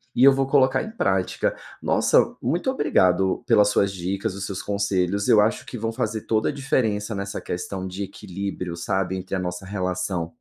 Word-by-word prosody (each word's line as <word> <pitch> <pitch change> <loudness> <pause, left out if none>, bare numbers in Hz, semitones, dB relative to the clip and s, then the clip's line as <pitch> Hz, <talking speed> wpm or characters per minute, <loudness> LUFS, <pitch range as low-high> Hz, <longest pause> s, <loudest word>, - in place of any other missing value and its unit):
e 125 - +4
eu 140 - +9
vou 135 0 +1
colocar 130 -1 +3
em 220 - -7
prática. 95 - 0 0.3
Nossa, - - +3
muito 170 - 0
obrigado 95 - +2
pelas 105 -4 +5
suas 100 -1 +2
dicas, 95 +2 -3
os 100 0 -4
seus 95 -1 -4
conselhos, 100 -1 0
eu 105 - +6
acho 110 +4 0
que - - -8
vão 115 +1 -2
fazer 110 -1 -2
toda 110 -1 +2
a - - 0
diferença 110 -7 -1
nessa 100 0 -4
questão 95 +1 -4
de 95 +2 -5
equilíbrio, 95 -2 -5
sabe, 95 +1 -1
entre 95 +1 -7
a 95 - -1
nossa 90 +1 -4
relação 90 -3 -2
100 Hz, 185 wpm, -24 LUFS, 95-115 Hz, 0.3 s, eu